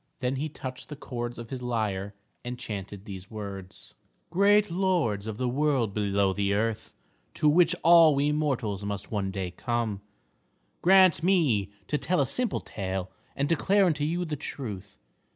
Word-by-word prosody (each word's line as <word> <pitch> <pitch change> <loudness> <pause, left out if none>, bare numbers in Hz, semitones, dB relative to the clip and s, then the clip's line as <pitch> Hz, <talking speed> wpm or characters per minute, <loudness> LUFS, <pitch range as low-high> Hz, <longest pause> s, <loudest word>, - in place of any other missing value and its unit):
Then 130 0 -1
he 155 +3 -2
touched 130 -3 -8
the 150 - -6
chords 120 -4 -5
of 115 -1 -9
his 130 -2 -5
lyre 105 -5 -2 0.3
and 125 0 -5
chanted 100 -3 -7
these 95 -3 -9
words: 100 -4 -8 0.4
"Great 205 +2 +4
lords 170 - 0
of 110 -2 -5
the 125 - -1
world 130 -5 +1
below 100 -2 +1
the 100 0 0
earth, 110 +1 -2 0.4
to 150 - +2
which 170 +3 +5
all 165 -3 +7
we 145 +2 +2
mortals 130 -10 -1
must 100 -1 -5
one 100 -3 -1
day 95 -2 -4
come, 115 -1 -2 0.8
grant 185 -2 +6
me 160 - +2 0.2
to 150 - -1
tell 180 0 0
a 140 - +3
simple 245 - 0
tale 95 -2 -4 0.2
and 140 +1 0
declare 195 +5 +3
unto 155 -5 +1
you 170 +4 -1
the 155 -2 -3
truth. 105 -9 -7
125 Hz, 165 wpm, -27 LUFS, 100-155 Hz, 0.8 s, all